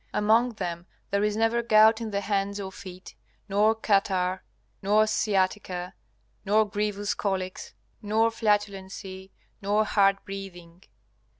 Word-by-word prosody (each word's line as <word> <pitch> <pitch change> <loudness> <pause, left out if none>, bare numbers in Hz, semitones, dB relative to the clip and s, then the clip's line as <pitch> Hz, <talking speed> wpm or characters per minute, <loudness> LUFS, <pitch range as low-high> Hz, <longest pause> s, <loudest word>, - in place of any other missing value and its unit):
Among 225 +3 +3
them 175 -4 -5 0.2
there 200 +1 +1
is 210 0 0
never 225 +1 +2
gout 220 0 +5
in 225 - -3
the 200 -1 -2
hands 200 0 -1
or 190 -1 -5
feet, 185 -1 -11 0.3
nor 210 +2 +3
catarrh, 190 -4 +1 0.4
nor 210 +2 +3
sciatica, 190 -3 -1 0.5
nor 210 +1 +3
grievous 205 0 -2
colics, 185 - -4 0.3
nor 220 +2 +2
flatulency, 195 -3 -2 0.3
nor 205 +2 +1
hard 195 -1 +3
breathing. 180 -3 -9
200 Hz, 120 wpm, -26 LUFS, 190-215 Hz, 0.5 s, gout